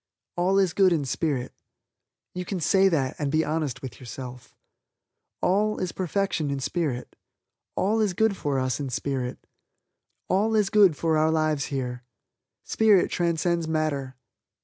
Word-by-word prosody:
All 185 +2 +2
is 190 -4 +3
Good 190 -2 +4
in 150 -4 0
spirit. 135 -2 -2 0.8
You 180 - -4
can 185 0 -4
say 195 +4 +4
that 135 -7 0
and 145 -2 -1
be 155 +1 +2
honest 150 -4 -2
with 120 -7 -8
yourself. 125 +1 -9 0.9
All 210 +3 +2
is 185 -2 -2
perfection 185 -4 -1
in 140 -1 -2
spirit. 135 -2 -3 0.6
All 215 +4 +1
is 205 -4 +1
good 220 0 +2
for 145 -6 -2
us 130 -2 -1
in 140 -2 -3
spirit. 130 0 -3 0.8
All 215 +4 +2
is 210 -2 +2
good 195 -8 +5
for 160 -2 +1
our 155 +1 +3
lives 155 -3 +1
here. 125 -3 -4 0.6
Spirit 210 -4 +3
transcends 170 -1 0
matter. 150 -4 -1
160 Hz, 150 wpm, -26 LUFS, 135-190 Hz, 0.9 s, good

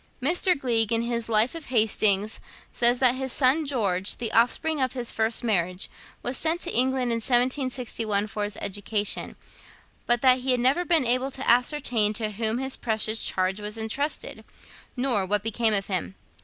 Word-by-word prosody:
Mr. 345 +4 +1
Gleig, 230 -4 +1
in 230 0 +1
his 235 -1 -1
'Life 220 +2 +2
of 330 -2 -7
Hastings,' 215 -3 +1 0.3
says 240 +1 +4
that 250 -1 +4
his 265 0 -4
son 280 +4 +2
George, 200 -8 0
the 230 -3 -4
offspring 280 +6 +1
of 260 -2 0
his 245 -3 -2
first 225 +1 -1
marriage, 185 -5 -1 0.3
was 245 +1 -2
sent 325 +2 0
to 350 - -2
England 255 0 +1
in 230 - 0
1761 245 -4 0
for 210 0 -5
his 205 0 -4
education, 205 +1 -3 0.7
but 240 0 +2
that 255 -1 +4
he 260 +1 -5
had 250 -1 +3
never 265 +8 +2
been 325 -6 +3
able 255 +3 +1
to 270 0 -6
ascertain 245 -3 +2
to 215 0 -3
whom 220 +2 0
this 265 +1 -2
precious 220 -1 0
charge 190 +2 0
was 210 +1 -5
entrusted, 265 +7 -4 0.5
nor 245 -6 0
what 205 +2 -1
became 225 0 +1
of 195 -1 0
him. 190 0 -4
235 Hz, 175 wpm, -25 LUFS, 215-260 Hz, 0.7 s, says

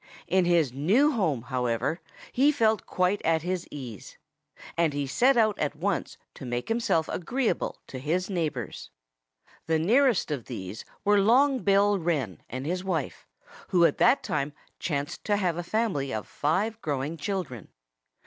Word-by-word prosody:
In 185 0 +2
his 165 -7 +2
new 205 - +3
home, 165 - 0
however, 125 +5 -1 0.3
he 280 +4 +4
felt 220 -7 +1
quite 185 +2 +1
at 160 -1 +2
his 180 0 -2
ease. 125 -9 -9 0.6
And 165 -3 +2
he 145 0 -1
set 245 - +3
out 215 -3 +3
at 150 0 -1
once 190 +7 -2 0.2
to - - -11
make 120 - -3
himself 225 -8 +1
agreeable 240 +7 -1
to 130 - -8
his 170 +7 -1
neighbors. 155 - -3 0.8
The 160 0 +2
nearest 230 - +3
of 135 -6 -3
these 105 -4 -7 0.2
were 205 0 +5
Long 260 +6 +4
Bill 200 -1 +3
Wren 145 - -2
and 130 +3 -5
his 180 +3 -2
wife, 170 -7 -3 0.4
who 175 -2 +4
at - - +1
that 255 +4 +4
time 140 +1 -2 0.3
chanced 145 -3 -3
to 205 -1 +2
have 180 -5 0
a - - -1
family 175 - -1
of 110 -3 -4
five 205 +9 -1
growing 145 +1 -2
children. 160 - -4
170 Hz, 160 wpm, -27 LUFS, 140-205 Hz, 0.8 s, were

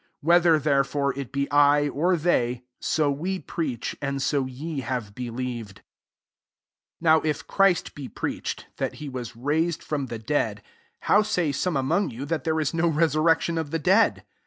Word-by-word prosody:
11 - - -10 0.3
Whether* - - +5
therefore 140 -1 +1
ii 140 0 -4
be 140 +2 -2
I, 145 0 +5
or 170 +6 +1
they, 125 -7 +1 0.2
so 150 -2 +1
we 175 +7 -2
preach, 140 -10 -4
and 140 0 -2
so 135 0 0
ye 145 +4 -5
have 125 -6 -4
believed* 120 -3 -5
15 - - -23 1.2
Now 160 -1 +5
if 155 -1 -2
Christ 195 -3 +2
be 140 -3 -7
preach - - -3
ed, - - -18
that - - -2
he 150 - -7
was 125 -3 -6
raised 155 +7 0
from 145 -3 -3
ther 115 -1 -5
dead, 110 -4 -1 0.4
how 210 - +4
saj 180 -9 0
some 175 0 0
among 160 +9 +1
you 125 +4 -6
that 160 +2 -3
there 160 -1 +1
is 150 -1 -1
no 170 +1 +2
resurrection 165 +1 +2
of 160 -3 -3
the 165 - -1
dead? 190 +8 +3
145 Hz, 180 wpm, -25 LUFS, 130-165 Hz, 1.2 s, Whether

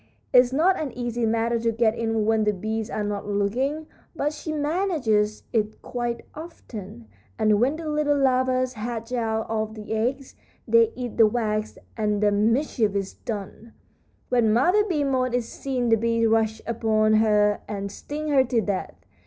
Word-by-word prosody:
It's 250 -1 +6
not 340 +8 +3
an 295 -4 -3
easy 240 -1 -2
matter 230 +1 +1
to 230 0 +1
get 225 -1 +2
in 225 -2 -1
when 220 0 +2
the 210 0 +2
bees 220 +3 -3
are 210 - -2
not 205 -1 -3
looking, 245 +10 -1 0.3
but 295 0 -1
she 315 - -6
manages 290 - 0
it 215 -2 0
quite 240 -1 -3
often; 215 - -9 0.3
and 215 0 +3
when 265 +5 +2
the 320 0 -6
little 300 -1 +1
larvas 255 -1 +2
hatch 230 +1 -5
out 225 -2 -1
of 220 0 -2
the 215 0 -6
eggs, 255 +5 -2 0.3
they 460 -1 +4
eat 245 -3 -5
the 225 -2 +7
wax 215 -1 -2 0.2
and 210 -2 0
the 205 - +4
mischief 220 0 +1
is 195 -1 -2
done. 225 0 -7 0.6
When 240 -3 +3
Mother 355 - +4
Bee 340 -8 0
Moth 255 -3 0
is 240 -2 -1
seen 255 -3 -2
the 225 - +5
bees 230 +1 +1
rush 220 -1 +1
upon 220 -2 +1
her 210 -1 +3
and 200 -1 -4
sting 300 +7 -5
her 275 -3 +5
to 245 -2 0
death. 200 -3 -3
230 Hz, 170 wpm, -24 LUFS, 215-260 Hz, 0.6 s, the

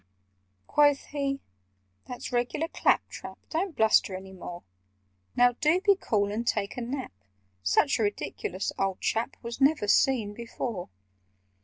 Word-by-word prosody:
Quoth 290 -1 +3
he 275 -1 -1 0.7
"That's 250 +1 -6
regular 245 +6 0
clap - - +2
trap: - - -9
Don't 340 +1 -1
bluster 220 -3 +4
any 190 0 -9
more. 175 -1 -8 0.7
Now 245 0 +6
do 310 +8 +2
be 400 +1 +4
cool 205 - 0
and 230 +3 -3
take 205 -4 0
a 250 - -4
nap! 255 - -4 0.5
Such 165 - +3
a - - +1
ridiculous 205 -2 -2
old 195 -1 0
chap 225 +1 -1
Was 235 +3 -6
never 275 -6 +4
seen 220 -1 +3
before! 230 -3 -5
235 Hz, 140 wpm, -28 LUFS, 205-280 Hz, 0.7 s, Now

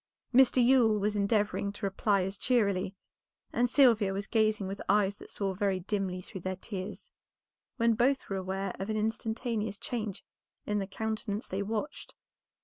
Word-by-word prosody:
Mr. 255 -1 +6
Yule 240 -4 +5
was 210 +1 0
endeavoring 205 0 +1
to 205 - -6
reply 195 0 +1
as 195 +2 -3
cheerily, 200 -5 +1 0.6
and 245 0 +2
Sylvia 230 -7 +5
was 200 +1 -2
gazing 215 -2 +1
with 195 +1 -5
eyes 200 0 +3
that - - -13
saw 195 -2 -2
very 190 -1 0
dimly 185 -1 -2
through 190 0 -9
their 185 +1 -3
tears, 190 0 -7 0.7
when 230 -1 +3
both 260 +5 +1
were 195 - -2
aware 190 0 -3
of 195 +2 -4
an 215 - 0
instantaneous 220 -1 -2
change 220 -5 -4 0.4
in 210 0 0
the 195 - -3
countenance 220 +1 -3
they 190 +2 -2
watched. 220 +8 -4
205 Hz, 160 wpm, -30 LUFS, 195-225 Hz, 0.7 s, Mr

